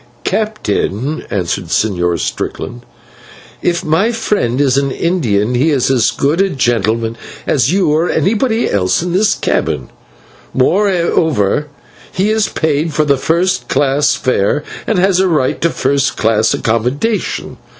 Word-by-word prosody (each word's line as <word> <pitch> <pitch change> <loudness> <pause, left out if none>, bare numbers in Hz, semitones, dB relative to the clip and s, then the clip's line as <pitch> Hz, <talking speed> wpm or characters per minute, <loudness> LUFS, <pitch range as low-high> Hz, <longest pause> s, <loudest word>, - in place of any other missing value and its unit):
"Captain," 155 - -2
answered 90 -2 -2
the - - -13
Señor 90 -4 0
Strickland, - - -4 0.8
"if 175 +1 -1
my 165 +9 +2
friend 210 - -1
is 135 -3 +3
an 140 0 +1
Indian, 125 - 0
he 130 +6 +2
is 135 -3 +1
as 125 -4 +3
good 150 +6 0
a 195 - +2
gentleman 115 - 0 0.3
as 135 -1 +2
you 185 -4 +2
or 160 +3 +1
anybody 225 +3 +1
else 95 - +1
in 175 -1 -3
this 200 +3 +3
cabin; - - -2 0.6
moreover, 160 - +1 0.4
he 195 +3 0
has 220 -1 +2
paid 155 0 -1
for 155 +1 +1
a 140 -2 +2
first 175 +7 0
class 140 +1 +2
fare 130 0 0 0.2
and 220 - +1
has 185 0 +3
a 190 - +3
right 150 -7 0
to 170 - +2
first 140 -2 0
class 110 0 +2
accommodation. 125 - -1
145 Hz, 140 wpm, -15 LUFS, 120-180 Hz, 0.8 s, is